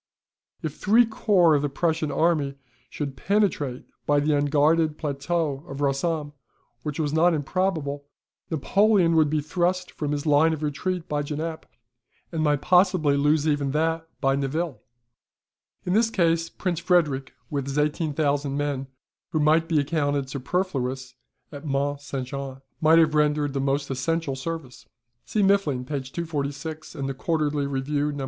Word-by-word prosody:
If 155 Hz, -2 st, -3 dB
three 225 Hz, +4 st, +5 dB
corps 200 Hz, -7 st, +3 dB
of 145 Hz, -, +3 dB
the 145 Hz, -, -1 dB
Prussian 160 Hz, +1 st, 0 dB
army 155 Hz, -5 st, +1 dB, 0.3 s
should 140 Hz, -3 st, -4 dB
penetrate 170 Hz, -10 st, 0 dB, 0.2 s
by 145 Hz, 0 st, +4 dB
the 150 Hz, +1 st, +1 dB
unguarded 150 Hz, +2 st, +2 dB
plateau 145 Hz, 0 st, -2 dB
of 135 Hz, -3 st, -7 dB
Rossomme, 145 Hz, +2 st, -1 dB, 0.5 s
which 150 Hz, +3 st, -4 dB
was 150 Hz, -2 st, 0 dB
not 165 Hz, +2 st, +4 dB
improbable, 150 Hz, -2 st, -1 dB, 0.4 s
Napoleon 185 Hz, +2 st, +3 dB
would 155 Hz, -2 st, +4 dB
be 155 Hz, 0 st, +1 dB
thrust 180 Hz, +4 st, -1 dB
from 150 Hz, -2 st, -3 dB
his 145 Hz, 0 st, -2 dB
line 155 Hz, +2 st, +4 dB
of 155 Hz, -1 st, -5 dB
retreat 170 Hz, +4 st, -2 dB
by 150 Hz, -2 st, -1 dB
Genappe, 155 Hz, +2 st, -4 dB, 0.6 s
and 165 Hz, -2 st, -2 dB
might 145 Hz, -2 st, +2 dB
possibly 180 Hz, -5 st, +4 dB
lose 150 Hz, +2 st, +2 dB
even 145 Hz, -2 st, +1 dB
that 160 Hz, +1 st, 0 dB
by 135 Hz, -1 st, +2 dB
Nivelles. 140 Hz, +3 st, -2 dB, 1.1 s
In 180 Hz, -, 0 dB
this 225 Hz, +2 st, +3 dB
case 165 Hz, -5 st, +1 dB
Prince 180 Hz, -4 st, -2 dB
Frederick 150 Hz, -7 st, +1 dB, 0.2 s
with 140 Hz, -2 st, -2 dB
his 140 Hz, +1 st, -3 dB
18,000 145 Hz, -2 st, 0 dB
men 145 Hz, -2 st, -2 dB, 0.4 s
(who 160 Hz, -2 st, -1 dB
might 155 Hz, +2 st, +3 dB
be 160 Hz, -3 st, +3 dB
accounted 145 Hz, -2 st, 0 dB
superfluous 130 Hz, -3 st, -2 dB, 0.4 s
at 145 Hz, -1 st, -9 dB
Mont 140 Hz, -1 st, -1 dB
St. 135 Hz, -2 st, -4 dB
Jean), 135 Hz, 0 st, -6 dB, 0.2 s
might 160 Hz, +1 st, +6 dB
have 160 Hz, -2 st, +4 dB
rendered 150 Hz, -1 st, +2 dB
the 140 Hz, -, -1 dB
most 140 Hz, +1 st, -1 dB
essential 145 Hz, +2 st, -1 dB
service." 145 Hz, -2 st, -6 dB, 0.4 s
See 210 Hz, -, +1 dB
Muffling, 190 Hz, -11 st, +2 dB
p. 140 Hz, 0 st, -3 dB
246 155 Hz, +1 st, -5 dB
and 135 Hz, -, -3 dB
the 135 Hz, -, -2 dB
QUARTERLY 150 Hz, 0 st, -1 dB
REVIEW, 145 Hz, +2 st, -1 dB
No. 145 Hz, -, -6 dB
150 Hz, 155 wpm, -25 LUFS, 140-165 Hz, 1.1 s, might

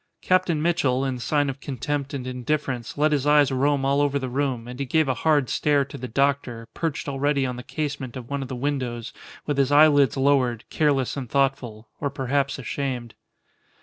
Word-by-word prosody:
Captain 185 Hz, -3 st, +2 dB
Mitchell, 145 Hz, -5 st, +1 dB
in 130 Hz, -2 st, -2 dB
sign 145 Hz, +3 st, +1 dB
of 135 Hz, 0 st, -4 dB
contempt 140 Hz, +1 st, -3 dB
and 135 Hz, -3 st, -5 dB
indifference, 130 Hz, -1 st, -3 dB
let 150 Hz, +1 st, +3 dB
his 145 Hz, -1 st, +1 dB
eyes 145 Hz, -1 st, +5 dB
roam 135 Hz, +1 st, +1 dB
all 140 Hz, +1 st, +2 dB
over 145 Hz, -1 st, +1 dB
the 130 Hz, -2 st, -3 dB
room, 130 Hz, -3 st, -1 dB
and 125 Hz, +1 st, -8 dB
he 140 Hz, -, -1 dB
gave 155 Hz, +3 st, +2 dB
a 130 Hz, -, +2 dB
hard 150 Hz, -2 st, +2 dB
stare 145 Hz, +1 st, +2 dB
to -, -, -11 dB
the 125 Hz, -, -6 dB
doctor, 130 Hz, -3 st, 0 dB
perched 160 Hz, -4 st, -3 dB
already 140 Hz, 0 st, 0 dB
on 125 Hz, -1 st, -3 dB
the 125 Hz, -, -7 dB
casement 140 Hz, -3 st, -4 dB
of 120 Hz, -2 st, -8 dB
one 140 Hz, +1 st, -3 dB
of 135 Hz, -, -5 dB
the 130 Hz, -, -5 dB
windows, 125 Hz, -3 st, -3 dB, 0.3 s
with 145 Hz, -2 st, -1 dB
his 140 Hz, 0 st, +2 dB
eyelids 145 Hz, -2 st, +5 dB
lowered, 135 Hz, -4 st, +2 dB
careless 140 Hz, -5 st, +1 dB
and 130 Hz, -4 st, -5 dB
thoughtful 130 Hz, -5 st, -1 dB
or 140 Hz, -, -1 dB
perhaps 140 Hz, +1 st, -1 dB
ashamed. 125 Hz, -2 st, -4 dB
140 Hz, 195 wpm, -24 LUFS, 125-145 Hz, 0.3 s, eyes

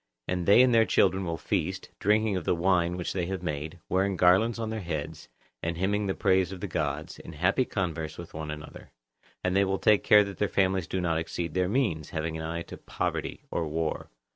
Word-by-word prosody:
And 90 Hz, -1 st, -2 dB
they 105 Hz, +5 st, +8 dB
and 125 Hz, -1 st, +3 dB
their 115 Hz, -1 st, +6 dB
children 95 Hz, 0 st, +2 dB
will 85 Hz, -1 st, -2 dB
feast, 95 Hz, 0 st, -2 dB
drinking 105 Hz, 0 st, +2 dB
of 90 Hz, -, -2 dB
the 85 Hz, -, +1 dB
wine 90 Hz, 0 st, +1 dB
which 90 Hz, -, -3 dB
they 90 Hz, -3 st, -1 dB
have 95 Hz, -1 st, -4 dB
made, 75 Hz, +1 st, -4 dB
wearing 95 Hz, 0 st, +1 dB
garlands 95 Hz, +7 st, +4 dB
on 110 Hz, -1 st, -3 dB
their 110 Hz, -, -3 dB
heads, 80 Hz, -6 st, -5 dB, 0.3 s
and 85 Hz, 0 st, -2 dB
hymning 100 Hz, +3 st, 0 dB
the 95 Hz, -, -1 dB
praises 95 Hz, -2 st, +2 dB
of 95 Hz, -, -8 dB
the 100 Hz, -, -4 dB
gods, 80 Hz, -4 st, -3 dB
in -, -, -10 dB
happy 90 Hz, -, +2 dB
converse 85 Hz, -7 st, -3 dB
with 85 Hz, -1 st, -9 dB
one 80 Hz, -1 st, -5 dB
another. 75 Hz, 0 st, -8 dB, 0.5 s
And 90 Hz, 0 st, 0 dB
they 100 Hz, -, +5 dB
will 95 Hz, 0 st, 0 dB
take 105 Hz, +5 st, +3 dB
care 105 Hz, 0 st, +7 dB
that 100 Hz, -1 st, -8 dB
their 105 Hz, -, +2 dB
families 95 Hz, -3 st, +1 dB
do 95 Hz, -, -2 dB
not 85 Hz, -2 st, +1 dB
exceed 85 Hz, 0 st, -4 dB
their 90 Hz, 0 st, +1 dB
means; 100 Hz, -, 0 dB
having 80 Hz, 0 st, -3 dB
an 80 Hz, -, -4 dB
eye 85 Hz, +1 st, -3 dB
to -, -, -10 dB
poverty -, -, -3 dB
or 80 Hz, -, -1 dB
war. 80 Hz, +1 st, -2 dB
90 Hz, 220 wpm, -28 LUFS, 80-100 Hz, 0.5 s, they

